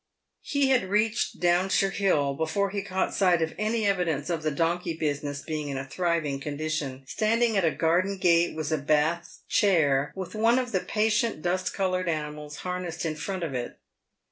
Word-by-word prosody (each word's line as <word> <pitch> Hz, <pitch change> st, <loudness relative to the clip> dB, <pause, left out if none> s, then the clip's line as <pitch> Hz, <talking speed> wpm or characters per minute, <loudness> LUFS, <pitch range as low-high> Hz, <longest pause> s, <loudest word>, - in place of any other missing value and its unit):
He 280 Hz, -2 st, +1 dB
had 245 Hz, -8 st, +2 dB
reached 215 Hz, +2 st, 0 dB
Downshire 185 Hz, +2 st, +2 dB
Hill 155 Hz, -9 st, +1 dB
before 160 Hz, +7 st, -1 dB
he 200 Hz, 0 st, -2 dB
caught 190 Hz, -1 st, -2 dB
sight 180 Hz, -4 st, +3 dB
of 160 Hz, -, -3 dB
any 220 Hz, +1 st, 0 dB
evi 195 Hz, -3 st, +2 dB
dence 155 Hz, -1 st, -2 dB
of 165 Hz, -2 st, -1 dB
the 155 Hz, -, 0 dB
donkey 165 Hz, +3 st, -1 dB
business 145 Hz, -2 st, -2 dB
being 155 Hz, -2 st, -4 dB
in 135 Hz, -, -3 dB
a 135 Hz, -, -4 dB
thriving 165 Hz, -2 st, -1 dB
condition. 145 Hz, -2 st, -3 dB
Stand 220 Hz, -, +1 dB
ing 230 Hz, -2 st, +2 dB
at 195 Hz, -, +2 dB
a 165 Hz, -, +4 dB
garden 175 Hz, +5 st, +1 dB
gate 170 Hz, -2 st, +3 dB
was 155 Hz, -1 st, -3 dB
a 155 Hz, -, +1 dB
Bath 155 Hz, +4 st, 0 dB
chair, 145 Hz, -8 st, +3 dB
with 190 Hz, -2 st, -6 dB
one 225 Hz, +3 st, +3 dB
of 250 Hz, -2 st, -1 dB
the 190 Hz, -, +1 dB
patient 215 Hz, -3 st, 0 dB
dust 185 Hz, +1 st, -1 dB
coloured 185 Hz, -2 st, 0 dB
animals 150 Hz, -1 st, -4 dB
harnessed 180 Hz, -2 st, -3 dB
in 160 Hz, -, -1 dB
front 185 Hz, +4 st, -4 dB
of 155 Hz, -5 st, -3 dB
it. 125 Hz, -1 st, -4 dB
170 Hz, 190 wpm, -27 LUFS, 150-195 Hz, -, a